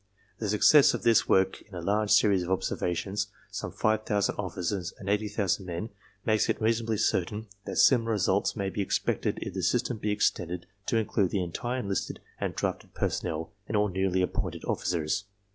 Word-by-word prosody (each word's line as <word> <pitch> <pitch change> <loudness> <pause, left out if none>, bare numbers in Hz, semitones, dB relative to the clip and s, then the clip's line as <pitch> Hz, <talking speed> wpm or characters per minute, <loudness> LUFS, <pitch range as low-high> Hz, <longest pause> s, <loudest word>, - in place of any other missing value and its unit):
"The 105 - -2
success 135 +8 +6
of - - -6
this 115 -1 +4
work 95 0 +3
in 105 - -14
a - - -4
large 105 +3 +1
series 100 -3 +5
of 90 - -4
observations, 95 +2 -1 0.2
some - - -4
five 110 0 +1
thousand 100 -2 +1
officers 90 -1 -3
and 95 - -10
eighty 105 +1 +1
thousand 100 -2 -1
men, 90 +6 -4 0.3
makes 110 -1 +2
it - - 0
reasonably 115 0 +1
certain 105 +4 0 0.2
that - - -4
similar 115 -4 +5
results 100 0 +1
may 100 -3 -2
be 105 - -2
expected 95 - 0
if - - -6
the - - -3
system 120 - 0
be 105 - -2
extended 90 -4 0 0.2
to 115 - +2
include 105 -3 +1
the 95 -1 0
entire 120 +9 -3
enlisted 100 -3 -3 0.2
and - - -2
drafted - - -3
personnel 80 +2 -2 0.2
and 110 - 0
all 105 0 +2
newly 95 0 +1
appointed - - -3
officers. 85 +2 -1
100 Hz, 180 wpm, -28 LUFS, 90-110 Hz, 0.3 s, success